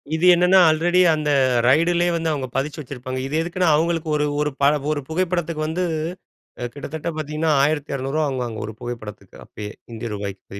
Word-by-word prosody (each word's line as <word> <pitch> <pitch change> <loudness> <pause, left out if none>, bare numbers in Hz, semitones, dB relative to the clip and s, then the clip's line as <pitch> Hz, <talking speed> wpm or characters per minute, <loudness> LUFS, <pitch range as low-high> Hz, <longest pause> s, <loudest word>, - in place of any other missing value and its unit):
இது 160 +3 +1
என்னன்னா, 180 +2 +5
ஆல்ரெடி 175 +3 +2
அந்த 150 -1 -1 0.4
ரைட்லேயே 170 +5 +3
வந்து 165 -1 -1
அவங்க 135 -3 -3
பதித்து 145 +3 -2
வச்சுருப்பாங்க. 130 -1 -6
இது 145 - -4
எதுக்குன்னா, 175 +1 0
அவங்களுக்கு 165 +1 0
ஒரு 150 - +1 0.2
ஒரு 150 0 0
ப - - +1 0.5
புகைப்படத்துக்கு 170 -2 -1
வந்து 180 +3 -1 0.9
கிட்டத்தட்ட 150 +2 -5
பார்த்தீங்கன்னா, 155 +1 0 0.2
₹1200 145 0 -2
வாங்குவாங்க 125 -5 -3
ஒரு 110 - -7
புகைப்படத்துக்கு 120 -4 -8
அப்பயே 105 0 -8 0.2
இந்திய 115 +1 -5
ரூபாய்க்கு 100 -1 -7
155 Hz, 145 wpm, -22 LUFS, 130-170 Hz, 0.9 s, என்னன்னா